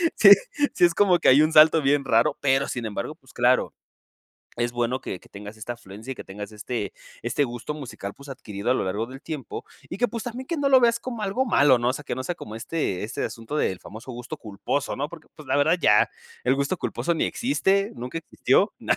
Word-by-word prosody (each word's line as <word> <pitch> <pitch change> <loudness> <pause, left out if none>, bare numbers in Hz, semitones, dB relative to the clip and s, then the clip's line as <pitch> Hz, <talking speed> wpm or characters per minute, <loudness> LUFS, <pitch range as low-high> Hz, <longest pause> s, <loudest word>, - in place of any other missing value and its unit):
Sí, 200 -2 +8 0.4
sí 175 - +5
es 170 - +1
como 185 -4 +4
que - - +4
hay 135 +3 +7
un 155 +1 +1
salto 155 +1 +8
bien 140 0 +2
raro. 115 -1 +3
Pero, 135 -1 +2
sin 120 -2 -3
embargo, 115 +7 -4
pues, 130 - -21
claro, 125 +1 +2 0.8
es 120 0 0
bueno 120 +1 -1
que 90 - -5
que - - -20
tengas 105 +2 -9
esta 120 +2 -5
afluencia 110 +2 -10
y - - -21
que - - -8
tengas 105 +2 -8
este 105 +1 -4 0.3
este 145 - +1
gusto 120 +5 -5
musical, 120 -8 -7
pues, 140 0 -13
adquirido 105 -2 -4
a - - +5
lo - - 0
largo 105 +5 -1
del 135 +1 -10
tiempo 155 -5 -6 0.2
y 180 - -5
que, 245 - +2
pues, 230 -2 -5
también 250 +2 -6
que 335 - -2
no 280 -1 +1
lo 260 -1 +7
veas 235 0 +3
como 235 -4 -6
algo 240 +7 0
malo, 145 - +5
¿no? 120 +1 +1
O - - 0
sea, 150 - -6
que - - -3
no 130 - -4
sea 175 - -3
como 105 - -9
este 115 - -2
este 110 - -4
asunto 115 +6 -5
del 95 -9 0
famoso 115 +5 -10
gusto 120 0 -7
culposo, 110 +7 -3
¿no? 145 +3 -3
Porque, 165 -2 -12
pues, 155 -4 -13
la 135 - +1
verdad, 145 +5 +3
ya 105 0 +5 0.3
el 130 +2 +3
gusto 140 +6 -1
culposo 170 0 -1
ni - - +1
existe, 200 -6 +1
nunca 125 +6 -5
existió, 160 - +1
na - - +1
135 Hz, 235 wpm, -25 LUFS, 115-165 Hz, 0.8 s, Sí